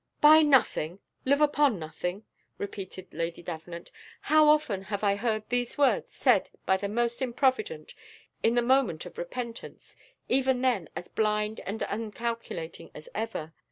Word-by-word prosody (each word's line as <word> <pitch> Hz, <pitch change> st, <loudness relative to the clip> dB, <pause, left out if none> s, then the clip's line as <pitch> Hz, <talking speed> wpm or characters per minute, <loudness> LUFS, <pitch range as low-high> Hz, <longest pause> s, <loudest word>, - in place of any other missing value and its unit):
"Buy 310 Hz, +1 st, +8 dB
nothing 260 Hz, -, +3 dB, 0.3 s
live 280 Hz, +3 st, +3 dB
upon 290 Hz, -5 st, +3 dB
nothing!" 180 Hz, +5 st, -5 dB, 0.3 s
repeated 190 Hz, -2 st, -7 dB
Lady 165 Hz, +1 st, -4 dB
Davenant; 170 Hz, 0 st, -7 dB, 0.3 s
"how 310 Hz, 0 st, +5 dB
often 270 Hz, -11 st, +2 dB
have 205 Hz, 0 st, -4 dB
I 200 Hz, -1 st, +3 dB
heard 215 Hz, 0 st, -1 dB
these 245 Hz, -1 st, -1 dB
words 290 Hz, -, +2 dB
said -, -, +3 dB, 0.2 s
by 190 Hz, -, +4 dB
the 200 Hz, +1 st, -3 dB
most 235 Hz, +3 st, 0 dB
improvident, 265 Hz, -, 0 dB, 0.5 s
in 230 Hz, +1 st, +2 dB
the 240 Hz, -, +3 dB
moment 245 Hz, -10 st, +2 dB
of 180 Hz, -, -10 dB
repentance, 235 Hz, +6 st, -7 dB, 0.3 s
even 260 Hz, -1 st, +2 dB
then 240 Hz, -11 st, +1 dB
as 175 Hz, -, -6 dB
blind 210 Hz, 0 st, 0 dB
and 210 Hz, +3 st, -3 dB
uncalculating 225 Hz, -5 st, -5 dB
as 150 Hz, -, -11 dB
ever! 210 Hz, -8 st, -4 dB
225 Hz, 145 wpm, -28 LUFS, 190-260 Hz, 0.5 s, Buy